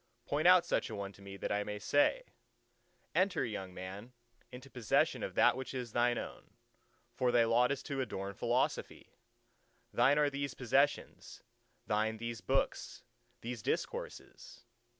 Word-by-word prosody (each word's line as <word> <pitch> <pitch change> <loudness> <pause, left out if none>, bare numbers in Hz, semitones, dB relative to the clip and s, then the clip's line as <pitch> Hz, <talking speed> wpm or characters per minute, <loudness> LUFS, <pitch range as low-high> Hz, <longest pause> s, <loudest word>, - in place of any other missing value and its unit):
Point 150 +4 +1
out 180 -1 +7
such - - 0
a 110 - -5
one 100 -1 -5
to 100 - -18
me, 100 0 -9
that - - -4
I 105 0 +1
may 105 0 -5
say, 145 - +2 0.9
"Enter, 185 -6 +2
young 95 -5 -5
man, 95 +6 -8 0.4
into 130 +2 -10
possession 125 -5 +1
of - - -5
that - - +5
which 130 +1 -6
is 125 -3 -4
thine 120 +1 +2
own. - - -8 0.6
For 125 -1 +1
thy 120 -1 +5
lot 120 +3 +3
is 140 - -3
to 140 -2 -3
adorn 100 -5 -4
Philosophy. - - -1 0.8
Thine 145 +2 +4
are 145 -1 +3
these 140 -1 -3
possessions; 135 +3 0 0.4
thine 110 +1 0
these 115 0 -5
books, - - -1 0.4
these 120 -1 -5
discourses!" 115 - -5
120 Hz, 150 wpm, -33 LUFS, 105-135 Hz, 0.9 s, out